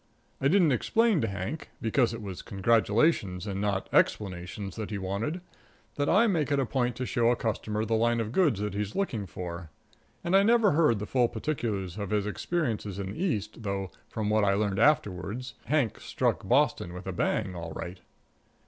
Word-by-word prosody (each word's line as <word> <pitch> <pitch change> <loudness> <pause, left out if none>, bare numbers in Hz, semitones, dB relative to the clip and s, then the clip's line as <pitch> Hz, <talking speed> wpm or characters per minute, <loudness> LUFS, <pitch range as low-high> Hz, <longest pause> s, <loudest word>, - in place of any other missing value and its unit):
I 135 - +3
didn't 170 -1 +4
explain 220 - +2
to 110 - 0
Hank, 100 - -5
because 115 +2 +2
it 115 -1 -6
was 95 -3 -6
congratulations 105 - +2
and 100 -2 -3
not 100 -2 -1
explanations 95 0 0
that 110 -2 -5
he 105 - -3
wanted, 100 - -3 0.5
and 145 0 0
I 205 +6 +5
make 165 -9 +1
it 140 - +3
a 135 - +2
point 125 -1 0
to 130 - -3
show 120 -2 +2
a 120 - +3
customer 110 -2 -2
the 115 - -1
line 115 +1 +2
of 110 -1 -2
goods 145 - +2
that 105 -1 -2
he's 105 0 -3
looking 115 - -1
for. 85 -1 -6 0.5
And 175 +2 +1
I 195 - +7
never 225 0 +4
heard 150 -7 +3
the 105 - -4
full 125 +1 +2
particulars 105 - -3
of 100 -2 -3
his 105 -1 +1
experiences 110 - -2
in 95 -1 -4
the 165 - -4
East, 110 - -2
though, 100 -3 -3 0.2
from 105 -2 -2
what 110 0 +3
I 100 -1 +3
learned 100 -1 0
afterward, 105 -4 +1 0.2
Hank 135 -4 +1
struck - - -1
Boston 85 - +2
with 90 +1 -8
a 95 - -3
bang, 95 +2 0
all 85 -1 -6
right. 90 +3 -6
110 Hz, 195 wpm, -28 LUFS, 100-135 Hz, 0.5 s, I